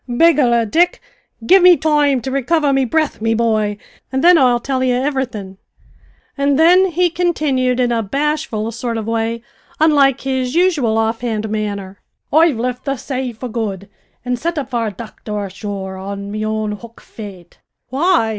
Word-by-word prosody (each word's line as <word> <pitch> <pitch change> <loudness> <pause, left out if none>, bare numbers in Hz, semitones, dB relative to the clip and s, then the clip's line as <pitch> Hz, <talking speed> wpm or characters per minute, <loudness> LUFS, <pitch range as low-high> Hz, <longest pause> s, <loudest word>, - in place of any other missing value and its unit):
"Begorrah, 245 -4 +3
Dick, 345 +11 +2 0.5
give 380 +8 +6
me 360 -1 +7
toime 295 -3 +2
to 265 - -4
recover 280 +2 +1
me 270 -1 +2
bre'th, 310 -2 -1
me 225 0 +1
bhoy, 215 -3 0 0.3
an' 265 0 -1
thin 355 +1 +7
I'll 250 -6 +4
till 260 +1 -2
ye 255 - +1
ivverythin'," 250 -8 -3 0.8
and 280 -1 +1
then 360 +4 +5
he 350 0 +1
continued 290 -8 0
in 245 -1 +2
a 230 -1 +1
bashful 275 -1 -2
sort 230 0 -4
of 220 - -4
way, 230 +1 -2 0.4
unlike 285 -4 +4
his 260 -1 -2
usual 315 -11 +2
off 225 +1 0
hand 220 -3 -2
manner, 200 -3 -4 0.3
"I've 315 -4 +4
lift 250 +2 -3
the 275 -1 -1
say 260 0 -4
for 235 +3 -7
good, 210 -4 -4 0.4
an' 250 0 -1
sit 335 +6 -3
up 275 -2 -4
for 235 -2 -1
a - - -3
docther 210 0 -6
ashore 195 -1 -6
on 200 +1 -6
me 215 +1 -3
own 215 0 -2
hook, 230 +2 -10
faith." 190 -6 -11 0.3
"Why!" 285 -2 +2
245 Hz, 170 wpm, -17 LUFS, 220-290 Hz, 0.8 s, me